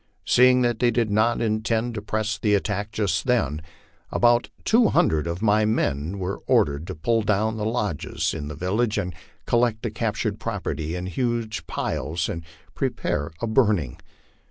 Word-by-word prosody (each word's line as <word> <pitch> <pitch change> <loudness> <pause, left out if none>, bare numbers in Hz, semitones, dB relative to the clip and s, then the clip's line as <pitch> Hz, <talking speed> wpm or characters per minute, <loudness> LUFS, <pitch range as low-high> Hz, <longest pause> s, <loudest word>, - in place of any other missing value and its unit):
Seeing 125 0 +5
that 120 -2 0
they 120 - +4
did 115 -2 0
not 110 +3 +2
intend 110 +1 0
to 105 - -4
press 110 0 -2
the 105 -1 +3
attack 105 0 -2
just 95 -8 -1
then, 80 - +1 0.5
about 120 0 +3 0.2
two 230 0 +5
hundred 80 +1 +2
of 85 +5 -4
my 105 0 +4
men 90 - 0
were 95 +1 -4
ordered 70 +3 +2
to - - -5
pull 115 +8 +1
down 110 +1 +1
the 105 - -2
lodges 105 - -1
in 75 -3 -5
the 75 - -6
village 105 - 0
and 90 -3 -2 0.3
collect 120 -2 +1
the 115 - -2
captured 110 -2 -2
property 90 -7 -3
in 90 0 -4
huge 110 - -2
piles 80 +1 -2 0.4
pre - - 0
paratory 80 +2 -3
to - - 0
burning. 105 - +1
105 Hz, 165 wpm, -24 LUFS, 90-115 Hz, 0.5 s, Seeing